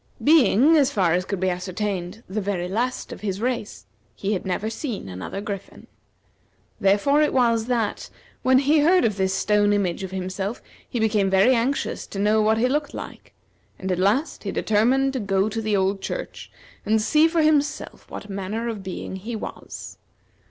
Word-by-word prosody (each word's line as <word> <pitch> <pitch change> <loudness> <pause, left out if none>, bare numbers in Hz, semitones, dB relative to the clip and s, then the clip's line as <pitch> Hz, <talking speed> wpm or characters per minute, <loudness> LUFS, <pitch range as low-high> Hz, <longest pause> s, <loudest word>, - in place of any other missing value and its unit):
Being, 295 0 +5
as 280 -3 +4
far 190 -11 +1
as 180 +1 0
could 200 -1 -3
be 185 0 +1
ascertained, 185 +2 -4
the 210 +3 -3
very 190 -3 -2
last 240 +7 -2
of - - -8
his 195 -2 -3
race, 240 -2 -3 0.3
he 200 +2 -2
had 190 - -3
never 190 +3 -1
seen 225 - -4
another 95 - -6
griffin. 200 -2 -7 0.9
Therefore 205 +10 +3
it 300 - +3
was, 230 -3 +2
that, 235 -4 -1 0.3
when 260 0 +4
he 290 +3 +3
heard 350 +5 +4
of 210 -3 0
this 190 -1 +1
stone 205 +1 +2
image 195 -4 0
of 190 - -4
himself, 190 +3 -4 0.3
he 240 - -3
became 210 -3 +2
very 195 +7 +5
anxious 255 +4 -1
to - - -8
know 210 +2 +3
what 220 +1 +3
he 240 +3 +2
looked 290 +2 -1
like, - - -9 0.4
and 190 0 -4
at 180 - 0
last 215 - +1
he - - -3
determined 255 +6 +2
to 260 - -2
go 195 -1 +1
to 225 +1 -3
the 215 -2 +1
old 195 +1 0
church, - - -6 0.3
and 220 +1 +2
see 300 +9 +4
for 330 -1 +1
himself 295 -1 0
what 205 - -8
manner 200 +4 -4
of 220 -3 -5
being 190 0 -6
he 220 +5 -6
was. 215 - -8
210 Hz, 185 wpm, -23 LUFS, 195-255 Hz, 0.9 s, Being